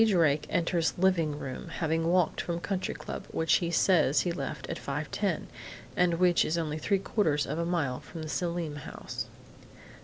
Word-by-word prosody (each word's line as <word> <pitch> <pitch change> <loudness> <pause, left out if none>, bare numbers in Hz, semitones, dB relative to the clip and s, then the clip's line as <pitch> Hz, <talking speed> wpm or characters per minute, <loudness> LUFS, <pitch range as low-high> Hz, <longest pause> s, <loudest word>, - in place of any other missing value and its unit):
Drake 165 -9 +3
enters 170 -1 +1
living 170 -5 +2
room, 130 -3 -6
having 165 0 0
walked 175 -2 +2
from 170 -1 -2
Country 190 +1 -2
Club, - - -6
which 160 0 +3
he 170 - -1
says 170 -4 +4
he 175 - 0
left 140 -3 -4
at - - -4
5:10, 155 +6 -2 0.5
and 175 -1 +3
which 175 0 +4
is 165 - 0
only 155 -2 -2
three 200 +5 +2
quarters 185 -6 +1
of 150 +3 -3
a 170 - 0
mile 155 -8 0
from 165 -2 -8
the - - -5
Selim 170 -2 -2
house. 145 - -6
165 Hz, 175 wpm, -29 LUFS, 150-180 Hz, 0.5 s, says